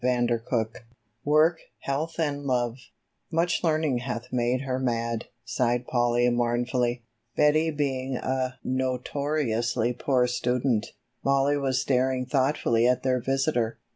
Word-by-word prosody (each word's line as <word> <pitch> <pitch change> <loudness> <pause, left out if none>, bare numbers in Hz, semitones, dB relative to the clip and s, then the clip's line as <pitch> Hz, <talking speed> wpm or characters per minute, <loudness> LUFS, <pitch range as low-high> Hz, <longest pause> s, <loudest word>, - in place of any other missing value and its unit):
CHAPTER 120 -2 +1
III 110 -2 -1 0.4
"WORK, 155 +3 +4 0.2
HEALTH 155 +5 -3
AND 145 -3 -1
LOVE" 120 -2 0 0.5
"Much 170 +2 +1
learning 155 -6 +1
hath 120 -1 -5
made 125 +1 +1
her 130 -1 -2
mad," 115 -2 -1 0.2
sighed 120 +1 0
Polly 120 0 +2
mournfully, 120 0 0 0.3
Betty 155 +2 +4
being 135 -3 -2
a 130 0 -2
notoriously 130 -2 -1
poor 125 0 +1
student. 125 -2 0 0.4
Mollie 140 +1 +2
was 130 -2 0
staring 130 -1 +1
thoughtfully 130 -3 +2
at 125 0 +1
their 130 -1 +2
visitor. 135 -3 0
130 Hz, 120 wpm, -26 LUFS, 120-140 Hz, 0.5 s, WORK